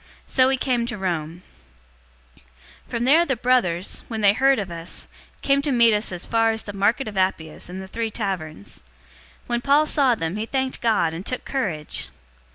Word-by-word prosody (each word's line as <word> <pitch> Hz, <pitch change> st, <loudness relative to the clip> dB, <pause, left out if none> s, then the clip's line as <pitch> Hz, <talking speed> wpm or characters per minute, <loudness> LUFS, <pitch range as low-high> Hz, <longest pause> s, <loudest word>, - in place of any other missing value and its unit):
So 255 Hz, -1 st, +3 dB
we 265 Hz, 0 st, +2 dB
came 245 Hz, -2 st, 0 dB
to 240 Hz, -2 st, -4 dB
Rome. 175 Hz, -2 st, -3 dB, 1.4 s
028:015 -, -, -28 dB
From 235 Hz, 0 st, -2 dB
there 300 Hz, +7 st, +5 dB
the 270 Hz, -6 st, -1 dB
brothers, 225 Hz, -8 st, +1 dB
when 225 Hz, -2 st, -4 dB
they 200 Hz, -1 st, +5 dB
heard 270 Hz, +4 st, +3 dB
of 195 Hz, -4 st, -4 dB
us, 165 Hz, 0 st, -4 dB, 0.4 s
came 280 Hz, 0 st, +3 dB
to 285 Hz, 0 st, -2 dB
meet 235 Hz, -3 st, +5 dB
us 210 Hz, -1 st, 0 dB
as 180 Hz, -1 st, -4 dB
far 225 Hz, 0 st, +2 dB
as 220 Hz, 0 st, 0 dB
The 205 Hz, -, -7 dB
Market 210 Hz, +7 st, +1 dB
of 205 Hz, -2 st, -6 dB
Appius 175 Hz, -4 st, -2 dB
and 185 Hz, +1 st, -6 dB
The -, -, -10 dB
Three 225 Hz, +3 st, -3 dB
Taverns. 185 Hz, -, -5 dB, 0.6 s
When 240 Hz, 0 st, -1 dB
Paul 285 Hz, +4 st, +4 dB
saw 275 Hz, -5 st, +3 dB
them, 165 Hz, -1 st, -3 dB
he 220 Hz, +1 st, -3 dB
thanked 265 Hz, 0 st, -2 dB
God, 210 Hz, -9 st, +2 dB
and 165 Hz, +3 st, -6 dB
took 255 Hz, +4 st, -3 dB
courage. 175 Hz, -, -2 dB
220 Hz, 190 wpm, -23 LUFS, 185-255 Hz, 1.4 s, there